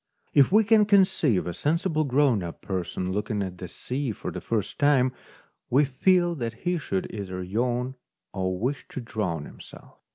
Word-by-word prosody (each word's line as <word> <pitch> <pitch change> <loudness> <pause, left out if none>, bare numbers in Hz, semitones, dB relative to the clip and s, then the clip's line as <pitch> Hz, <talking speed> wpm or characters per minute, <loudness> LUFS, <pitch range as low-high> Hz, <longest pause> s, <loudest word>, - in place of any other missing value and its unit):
If 140 +2 +5
we 215 +3 +6
can 215 0 +5
conceive 185 - +3
a 90 - -3
sensible 155 - 0
grown 135 -5 +3
up 85 -1 -7
person 90 -1 -3
looking 105 +1 -1
at 90 -1 -6
the 90 - -6
sea 130 +8 -4
for 105 - -6
the - - -6
first 110 -4 -2
time, 135 -3 +4 0.6
we 140 +4 +4
feel 175 +6 +2
that 115 -3 -3
he 175 -1 +1
should 95 -9 -2
either 95 -3 -5
yawn 120 +6 -1 0.4
or 95 -1 -1
wish 130 +8 -2
to - - -6
drown 95 - -3
himself. - - -14
125 Hz, 170 wpm, -26 LUFS, 95-145 Hz, 0.6 s, we